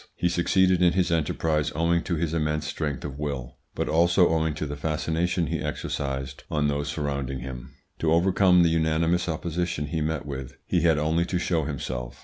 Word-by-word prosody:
He 90 - +1
succeeded 90 +1 +3
in 85 -1 +5
his 90 -2 +1
enterprise 75 -1 0
owing 85 +2 +2
to 85 - 0
his 80 0 -1
immense 75 -1 0
strength 75 -3 -3
of 70 -1 -6
will, 70 -5 -4 0.2
but - - -1
also 85 +3 +4
owing 80 -1 +1
to 75 - -3
the 75 0 -4
fascination 80 +4 -1
he - - -2
exercised 70 -1 -4
on 75 -1 +1
those 70 0 -1
surrounding 70 -3 -3
him. 65 -1 -8 0.2
To 80 - +1
overcome 90 +1 +4
the 85 - +4
unanimous 80 +2 +1
opposition 85 -1 -2
he 80 +2 -3
met 80 -1 -2
with, 65 -2 -6
he - - +1
had 80 -3 +4
only 80 +3 +1
to 90 - -1
show 85 -3 0
himself. 65 -4 -5
80 Hz, 185 wpm, -26 LUFS, 75-85 Hz, 0.2 s, in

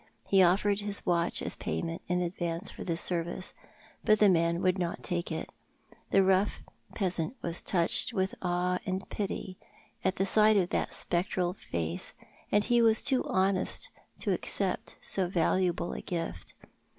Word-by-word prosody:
He 195 -1 +5
offered 200 +3 +3
his 205 -1 -4
watch 170 -1 +1
as - - 0
payment 165 0 -3
in 180 0 +1
advance 170 -1 -2
for - - -8
this 170 -1 0
service, 175 +1 -2 0.5
but 215 - +5
the 210 -1 +6
man 170 -1 +2
would 185 0 +2
not 175 -1 -3
take 175 -1 -2
it. 160 - -4 0.6
The 195 - +5
rough 190 +2 +2 0.3
peasant 185 +1 -1
was 170 0 -1
touched 170 +6 +2
with 190 -4 -1
awo 180 0 0
and 190 +1 -2
pity 190 -2 -4 0.5
at 190 - 0
sight 215 +2 +5
of 180 -3 +1
that - - -1
spectral 180 0 0
face, 85 - -4 0.4
and 205 0 +3 0.2
was 225 -1 +4
too 265 -2 +3
honest 190 +1 +1 0.3
to - - +1
accept - - -2
so 190 -2 0
valuable 175 0 +1
a - - -5
gift. 165 - -5
180 Hz, 150 wpm, -30 LUFS, 170-195 Hz, 0.6 s, the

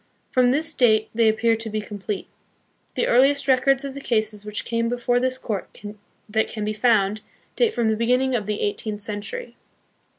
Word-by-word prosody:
From 250 -1 +4
this 315 +5 0
date 220 -4 +3
they 225 -1 +4
ap 220 - 0
pear 230 0 +3
to 225 0 -5
be 215 0 -2
complete. 205 -1 -5 0.7
The - - +1
earliest 275 +4 +3
records 270 +1 +3
of 275 - -5
the 280 - -8
cases 215 -4 -1
which 210 0 -4
came 230 0 -1
before 245 0 +1
this 255 +1 0
court 215 -6 -5 0.5
that 220 +1 0
can 215 -2 -5
be 215 - -1
found, 215 -2 +2 0.3
date 470 -2 +3
from 235 - 0
the 220 - +2
beginning 250 +4 +1
of 215 -4 -1
the 210 -1 -2
eighteenth 210 +1 -3
century. 210 - -4
230 Hz, 190 wpm, -23 LUFS, 215-255 Hz, 0.7 s, From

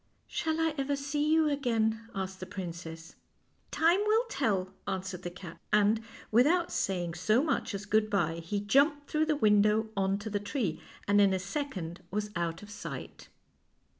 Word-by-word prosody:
"Shall 320 -1 -2
I 325 -1 +2
ever 280 +1 0
see 290 +2 -1
you 320 -1 +4
again 230 -6 +1
?'; - - -20
asked 190 -1 -4
the 185 - -6
princess. 165 -3 -7 0.3
" - - -43 0.2
Time 335 +4 +3
will 440 +2 +4
tell," 195 - 0
answered 190 -1 -3
the 175 - -4
cat, 175 -1 -10
and, 210 +1 +4 0.3
with 240 +5 +6
out 345 +1 +2
saying 175 -3 -1
so 215 - +2
much 310 -8 -1
as 200 +1 -5
good 215 +1 +2
by, 170 -6 +1
he 170 +5 -2
jumped 285 +7 +3
through 310 0 +2
the 310 - +2
window 215 -2 +3
on 195 0 +1
to 205 +1 -6
the 205 - 0
tree, 205 - -2 0.3
and 205 0 +5
in 195 -1 +4
a - - -1
sec 270 +6 -3
ond 170 0 -6
was 210 +2 -3
out 170 +1 -2
of 205 - -11
sight. 205 - -8
210 Hz, 190 wpm, -30 LUFS, 185-280 Hz, 0.3 s, with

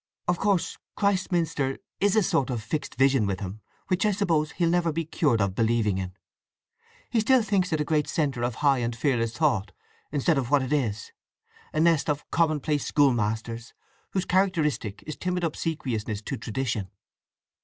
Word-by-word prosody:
"Of 175 0 +1
course 200 -4 0 0.2
Christminster 170 -8 0 0.2
is 205 0 +3
a 215 - +4
sort 135 -6 +1
of 120 -4 -3
fixed 150 +8 -3
vision 135 -4 +3
with 95 -1 -2
him, 100 +1 -6 0.3
which 185 0 +1
I 210 - +3
suppose 165 -6 +1
he'll 170 - +1
never 170 -1 +2
be 165 +1 -2
cured 145 -6 +1
of 100 -2 +1
believing 110 -2 +1
in. 90 -1 -5 1.0
He 235 - +2
still 245 +2 +4
thinks 195 -4 +1
it 155 - +1
a 150 - 0
great 150 -2 +1
centre 140 -6 -1
of 120 -1 -1
high 135 -2 +5
and 120 -1 -2
fearless 115 -2 0
thought, 115 - +1 0.4
instead 145 +1 +2
of 125 -3 -3
what 145 -2 +4
it 130 +3 -2
is, 110 -8 -1 0.6
a 155 - -1
nest 165 -1 +3
of 145 0 -2
commonplace 155 -3 +1
schoolmasters 115 -4 0 0.4
whose 190 -2 0
characteristic 160 - 0
is 155 - -5
timid 180 -1 -2
obsequiousness 120 -10 -2
to - - -3
tradition." 115 -3 -3
145 Hz, 170 wpm, -26 LUFS, 115-170 Hz, 1.0 s, high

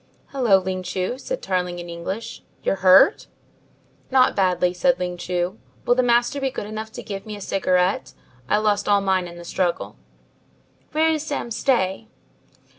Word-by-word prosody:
"Hello, 245 -8 +3
Ling 185 0 -3
Chu," 185 +7 -3
said - - -5
Tarling 180 -2 -1
in 175 0 -7
English, 170 +6 -6 0.2
"you're 195 - 0
hurt?" 190 - +5 0.8
"Not 260 -1 +4
badly," 180 -2 +2
said 260 +8 +2
Ling 180 -1 -3
Chu. 180 +3 -3 0.3
"Will 245 - +4
the 255 - +2
master 240 +3 +2
be 270 - +1
good 250 - -5
enough 215 +1 -6
to - - -7
give 200 -1 -7
me 215 - -5
a - - -9
cigarette? 185 -1 0 0.4
I - - +3
lost 210 -1 +1
all 200 -1 +4
mine 190 -2 +1
in 170 0 -11
the 175 - -10
struggle." 170 - -2 1.0
"Where 320 +1 +3
is 310 -1 -1
Sam 285 -5 -4
Stay?" 220 -4 0
195 Hz, 170 wpm, -22 LUFS, 180-240 Hz, 1.0 s, hurt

